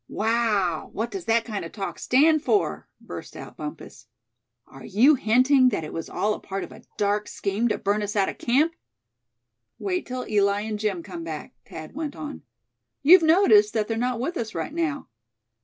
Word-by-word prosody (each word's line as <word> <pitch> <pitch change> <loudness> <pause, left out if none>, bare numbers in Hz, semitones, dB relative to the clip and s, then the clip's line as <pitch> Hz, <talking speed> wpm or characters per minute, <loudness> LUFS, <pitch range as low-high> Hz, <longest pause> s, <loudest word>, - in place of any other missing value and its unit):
"Wow! 210 -6 0
what 225 +3 -3
does 385 -3 -6
that 230 0 +2
kind 210 -4 -4
of 165 - -8
talk 195 -2 -5
stand 305 +4 +4
for?" 405 +5 0
burst - - -9
out - - -10
Bumpus. - - -9 0.6
"Are - - -14
you 235 +10 +4
hinting 255 +2 +4
that 200 -8 -2
it 155 - -7
was 165 - -5
all 210 +1 0
a - - -6
part 195 0 -5
of - - -9
a - - -13 0.2
dark 205 0 0
scheme 205 +4 -1
to 220 - 0
burn 205 +2 0
us 205 0 -4
out 195 -2 +2
of - - -6
camp?" 290 +7 +2 1.0
"Wait 365 -2 -2
till 255 0 -4
Eli 200 -1 +2
and 215 0 -4
Jim 200 -5 -2
come 175 -4 -7
back," 160 -2 -7
Thad 155 -1 -9
went 300 -1 -5
on. 295 -1 -7 0.6
"You've 350 +5 +8
noticed 315 - +5
that 215 -2 +1
they're 225 - -2
not 245 +1 -1
with 335 +8 -3
us 225 -3 -4
right 165 - -4
now. 320 -4 -2
225 Hz, 190 wpm, -25 LUFS, 200-280 Hz, 1.0 s, You've